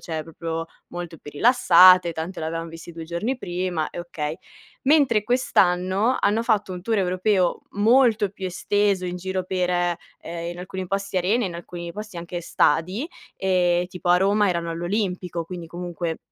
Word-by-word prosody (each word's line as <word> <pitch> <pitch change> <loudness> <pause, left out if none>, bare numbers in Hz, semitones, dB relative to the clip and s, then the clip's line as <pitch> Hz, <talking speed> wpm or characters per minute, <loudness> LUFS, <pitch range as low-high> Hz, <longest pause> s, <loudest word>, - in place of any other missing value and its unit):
Cioè 160 -2 -4
proprio 165 0 -5 0.2
molto 175 -2 -7
più 150 - -10
rilassate, 185 - +6
tanto 165 +4 -5
l'avevam 165 +1 -3
visti 165 +1 -10
2 165 0 -7
giorni 175 +11 -2
prima 175 -5 -2
e - - -6
okay. 155 -3 -4 0.5
Mentre 270 -7 +4
quest'anno, 200 -1 +2
hanno 215 +3 +2
fatto 215 -5 +1
un 180 -1 -7
tour 220 +2 0
europeo 185 0 +1
molto 220 -1 +3
più 195 -1 -6
esteso, 200 +1 0
in 180 - -3
giro 190 +1 -3
per, 180 -1 -1
ehm, 175 -1 -3
in 175 - -8
alcuni 185 +1 -5
posti 195 0 -2
arene, 200 +7 +2
in 175 - -6
alcuni 170 0 -7
posti 210 -1 -8
anche 170 +1 -5
stadi. 180 - +1 0.3
Ehm, 180 -2 +2
tipo 180 0 -6
a 175 - +6
Roma 200 +2 +3
erano 170 -2 -1
all'Olimpico, 180 -1 -2
quindi, 175 0 -7
comunque, 175 -1 -4
180 Hz, 160 wpm, -24 LUFS, 170-200 Hz, 0.5 s, rilassate